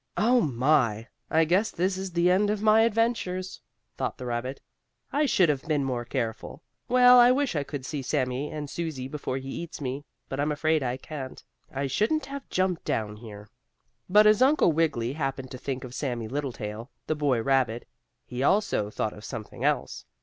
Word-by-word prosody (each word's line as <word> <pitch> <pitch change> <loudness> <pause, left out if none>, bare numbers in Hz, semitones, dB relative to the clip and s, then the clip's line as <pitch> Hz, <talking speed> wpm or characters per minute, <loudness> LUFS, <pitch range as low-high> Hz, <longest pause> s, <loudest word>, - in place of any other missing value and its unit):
"Oh, 240 +3 +4
my! 125 -4 +1 0.2
I 160 0 +3
guess 185 +7 +2
this 185 +2 -1
is 190 0 -5
the 175 +1 +3
end 200 +3 +3
of 210 0 0
my 215 0 +6
adventures," 225 -5 0 0.4
thought - - -2
the 125 - -7
rabbit. 120 +3 -3 0.5
"I 295 +1 +2
should 185 -8 +4
have 145 -3 0
been 150 -3 +1
more 125 -3 -2
careful. 120 +4 -4 0.3
Well, 250 0 +7
I 240 0 +8
wish 270 -5 +1
I 145 - +1
could 140 -2 -6
see 145 -1 -4
Sammie 130 0 -1
and 150 -2 -5
Susie 150 -5 -4
before 135 -2 -4
he 135 0 -7
eats 170 +4 -6
me, 135 0 -4 0.2
but 135 - -5
I'm 150 +2 +1
afraid 155 +1 +1
I 125 -1 -2
can't. 135 -1 -8 0.3
I 140 +1 -2
shouldn't 220 - 0
have 275 0 -8
jumped 185 -2 0
down 105 -1 -2
here." 105 -2 -11 0.6
But 210 +3 +6
as 215 +1 +5
Uncle 265 - +5
Wiggily 145 -7 0
happened 135 -3 -3
to 130 - -7
think 135 -1 -4
of 125 -1 -8
Sammie 120 -5 -3
Littletail, 120 -4 -5 0.2
the - - 0
boy 145 -5 +1
rabbit, 130 -3 +1 0.4
he 125 +1 -5
also 145 - +2
thought 105 0 -2
of 105 - -12
something 110 +1 -7
else. - - -1
145 Hz, 185 wpm, -27 LUFS, 125-185 Hz, 0.6 s, I